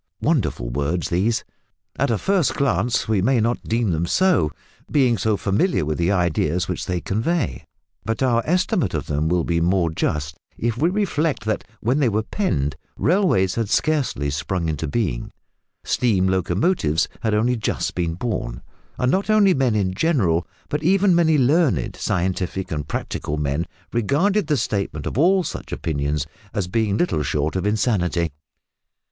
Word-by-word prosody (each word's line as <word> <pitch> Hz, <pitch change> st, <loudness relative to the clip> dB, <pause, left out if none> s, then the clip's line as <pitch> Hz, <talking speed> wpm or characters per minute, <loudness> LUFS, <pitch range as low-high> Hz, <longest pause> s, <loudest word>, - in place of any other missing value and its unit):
Wonderful -, -, 0 dB
words 75 Hz, +7 st, -1 dB
these! 100 Hz, +7 st, +1 dB, 0.5 s
At -, -, 0 dB
a 115 Hz, -, +2 dB
first 190 Hz, -, +1 dB
glance 125 Hz, -4 st, +1 dB
we 105 Hz, -3 st, +2 dB
may 125 Hz, +4 st, +3 dB
not 115 Hz, +2 st, 0 dB
deem 115 Hz, -3 st, 0 dB
them 85 Hz, +1 st, -1 dB
so, 180 Hz, -, +3 dB, 0.4 s
being 130 Hz, -5 st, +3 dB
so 110 Hz, 0 st, 0 dB
familiar 100 Hz, -, +1 dB
with 75 Hz, +1 st, -2 dB
the 85 Hz, +3 st, +2 dB
ideas 90 Hz, -2 st, +1 dB
which 90 Hz, -, -4 dB
they 90 Hz, -1 st, -1 dB
convey, 115 Hz, -, -1 dB, 0.4 s
but 115 Hz, +4 st, -1 dB
our 120 Hz, -3 st, +3 dB
estimate 180 Hz, +3 st, +1 dB
of -, -, -2 dB
them 75 Hz, +2 st, -1 dB
will 90 Hz, -1 st, +2 dB
be 85 Hz, 0 st, 0 dB
more 85 Hz, -1 st, +2 dB
just 75 Hz, -2 st, -2 dB, 0.2 s
if 115 Hz, -1 st, -1 dB
we 155 Hz, +8 st, +2 dB
reflect 165 Hz, -, 0 dB
that 110 Hz, -, -1 dB, 0.2 s
when 125 Hz, +6 st, +1 dB
they 135 Hz, -5 st, +3 dB
were 110 Hz, +1 st, 0 dB
penned 75 Hz, -, -1 dB, 0.2 s
railways 165 Hz, -, +2 dB
had 115 Hz, -3 st, -2 dB
scarcely 135 Hz, -, 0 dB
sprung 85 Hz, +4 st, -2 dB
into 80 Hz, 0 st, -2 dB
being, 70 Hz, -, -2 dB, 0.5 s
steam 100 Hz, -7 st, +1 dB
locomotives 95 Hz, -, +1 dB
had 110 Hz, -2 st, +1 dB
only 120 Hz, +4 st, +2 dB
just 110 Hz, -, -2 dB
been 85 Hz, -2 st, -1 dB
born, 95 Hz, -, -4 dB, 0.3 s
and 125 Hz, +1 st, +1 dB
not 195 Hz, +5 st, 0 dB
only 210 Hz, -3 st, +5 dB
men 130 Hz, -6 st, +1 dB
in 95 Hz, -3 st, 0 dB
general, 95 Hz, -, +1 dB, 0.2 s
but 150 Hz, -, -2 dB
even 190 Hz, +3 st, +4 dB
many 160 Hz, -2 st, +4 dB
learned, 145 Hz, +3 st, +2 dB
scientific 95 Hz, -1 st, -2 dB
and 75 Hz, -3 st, -3 dB
practical 75 Hz, -, -3 dB
men 75 Hz, +3 st, -1 dB, 0.3 s
regarded 150 Hz, -, +1 dB
the 150 Hz, -2 st, +2 dB
statement 100 Hz, -, -2 dB
of -, -, -3 dB
all 185 Hz, +4 st, +4 dB
such -, -, -6 dB
opinions 75 Hz, -1 st, -1 dB, 0.3 s
as 100 Hz, -4 st, -1 dB
being 105 Hz, +1 st, 0 dB
little 175 Hz, -, +1 dB
short 75 Hz, +2 st, -1 dB
of 95 Hz, +2 st, 0 dB
insanity. 90 Hz, -6 st, +1 dB
105 Hz, 165 wpm, -22 LUFS, 85-140 Hz, 0.5 s, only